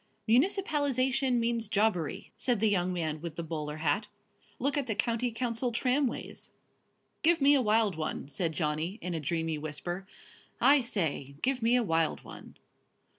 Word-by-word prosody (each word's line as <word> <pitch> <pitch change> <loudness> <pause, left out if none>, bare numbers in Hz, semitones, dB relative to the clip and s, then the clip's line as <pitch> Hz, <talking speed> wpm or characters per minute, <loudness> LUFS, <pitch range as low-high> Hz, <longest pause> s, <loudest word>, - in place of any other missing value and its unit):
"Municipalisation 270 - +2
means 230 -1 0
jobbery," 205 -6 0
said 245 -4 0
the 215 0 +3
young 185 -2 +1
man 160 -4 -2
with 170 -2 -6
the 170 - -4
bowler 155 -2 -4
hat; 160 +7 0 0.5
"look 275 +3 0
at 285 -3 -1
the 220 - -1
County 235 +3 0
Council 235 +1 -1
tramways." 250 +3 -1 0.7
"Give 335 +1 +4
me 280 +1 +6
a 275 - +4
wild 215 -4 +2
one," 155 -3 -3
said 160 +4 -2
Johnny, 155 +4 -1
in 180 - -3
a 165 - -1
dreamy 160 +1 -2
whisper; 175 +5 -5 0.5
"I 280 0 +6
say, 160 - -2
give 260 -1 +1
me 230 +2 +3
a 250 - +3
wild 165 -5 0
one." - - -12
215 Hz, 160 wpm, -30 LUFS, 165-250 Hz, 0.7 s, me